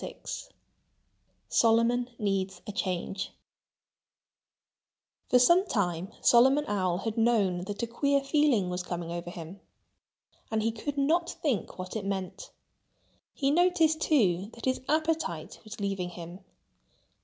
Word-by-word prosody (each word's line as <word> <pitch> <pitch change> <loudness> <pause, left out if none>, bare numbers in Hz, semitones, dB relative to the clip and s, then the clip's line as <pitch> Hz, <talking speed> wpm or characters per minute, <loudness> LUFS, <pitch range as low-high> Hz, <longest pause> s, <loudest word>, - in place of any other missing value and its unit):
VI - - -6 1.3
Solomon 235 +2 +3
Needs 195 -3 -1
a 210 - -5
Change 190 -2 -3 2.0
For 250 - +6
some 345 +10 +5
time 185 - -1
Solomon 265 +5 +5
Owl 185 -4 0
had 220 +3 -3
known 200 -6 +2
that 205 +2 -4
a - - +2
queer 280 +5 +1
feeling 275 - +2
was 180 0 -2
coming 175 -2 -5
over 175 0 -5
him. 175 +2 -9 0.9
And 220 -1 0
he 225 - +1
could 285 +6 -5
not 325 +5 +2
think 270 -10 -2
what 185 +2 -6
it 215 - -2
meant. 195 -2 -4 0.9
He 275 0 +1
noticed, 330 -1 +3
too, 200 - +2
that 235 - -8
his 260 0 0
appetite 310 - -1
was 215 +1 -9
leaving 195 -3 -2
him. 175 +1 -9
215 Hz, 130 wpm, -29 LUFS, 185-275 Hz, 2.0 s, For